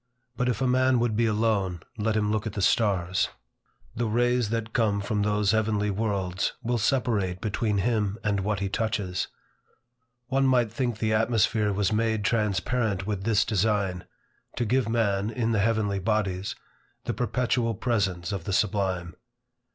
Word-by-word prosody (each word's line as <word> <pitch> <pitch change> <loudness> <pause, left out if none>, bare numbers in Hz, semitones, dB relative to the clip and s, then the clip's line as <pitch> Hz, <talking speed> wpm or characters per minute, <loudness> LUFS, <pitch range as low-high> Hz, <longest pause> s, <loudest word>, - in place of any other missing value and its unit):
But 125 0 0
if 120 -2 -2
a - - +2
man 130 0 +3
would 115 -2 +1
be 115 +1 +2
alone, 105 -5 0
let 110 0 0
him 105 -1 +1
look 110 +1 -1
at 105 - -5
the 100 - -3
stars. 95 -5 +2 0.7
The 120 0 -1
rays 120 0 +1
that 115 0 -3
come 105 -4 +2
from 105 +1 -1
those 105 -1 +2
heavenly 105 -2 +1
worlds, 95 -3 -1
will 120 0 0
separate 105 -7 0
between 105 0 -1
him 105 -1 0
and 100 -2 +1
what 100 0 -1
he 100 - 0
touches. 100 -3 -2 1.0
One 135 +1 +1
might 125 -4 +3
think 120 -1 -2
the 110 0 0
atmosphere 110 -1 +2
was 100 0 0
made 110 -1 0
transparent 105 -1 0
with 100 -2 -3
this 110 -3 +3
design, 100 -3 0 0.5
to 120 - -1
give 125 +1 +1
man, 105 -3 +1
in 115 0 -1
the 110 - +1
heavenly 105 -2 +1
bodies, 100 -2 -1 0.5
the - - -2
perpetual 120 -1 0
presence 100 -6 -1
of 95 -5 -4
the 100 - -2
sublime. 95 -4 0
105 Hz, 160 wpm, -26 LUFS, 100-115 Hz, 1.0 s, man